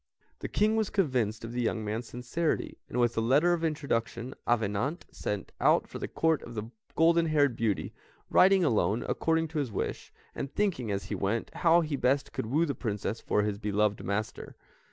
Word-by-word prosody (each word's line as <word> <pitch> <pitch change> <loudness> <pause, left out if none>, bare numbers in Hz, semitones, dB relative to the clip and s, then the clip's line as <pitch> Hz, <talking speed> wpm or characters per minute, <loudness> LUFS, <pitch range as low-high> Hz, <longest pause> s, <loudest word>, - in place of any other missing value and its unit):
The - - -4
King 215 +1 +2
was 220 -3 +1
convinced 125 - 0
of 115 - -6
the 125 +1 -2
young 110 -2 -1
man's 110 +3 -3
sincerity, 125 +7 -2
and 125 - -2
with 120 -1 +2
a - - +3
letter 145 +10 +4
of 170 -1 -2
introduction, 130 -6 -2
Avenant 120 - 0
set 105 -1 -4
out - - +4
for - - -8
the - - -3
Court 160 -1 +1
of 120 - -10
the 110 +2 -5 0.3
goldenhaired 160 -5 +4
beauty, 110 -3 -1 0.3
riding 190 0 +5
alone, 115 -4 +1
according 165 0 +1
to 160 -1 -2
his 135 -6 -2
wish, 100 - -4 0.2
and 135 - -5
thinking 180 - 0
as 100 -1 -1
he - - -5
went 105 +4 -2
how 170 0 +4
he 155 -3 -2
best 135 +2 +1
could - - -3
woo 150 +8 +2
the 145 - -2
Princess 105 -3 -3
for 105 - +1
his 105 -1 -2
beloved 105 0 0
master. 105 +2 -3
125 Hz, 190 wpm, -29 LUFS, 110-160 Hz, 0.3 s, riding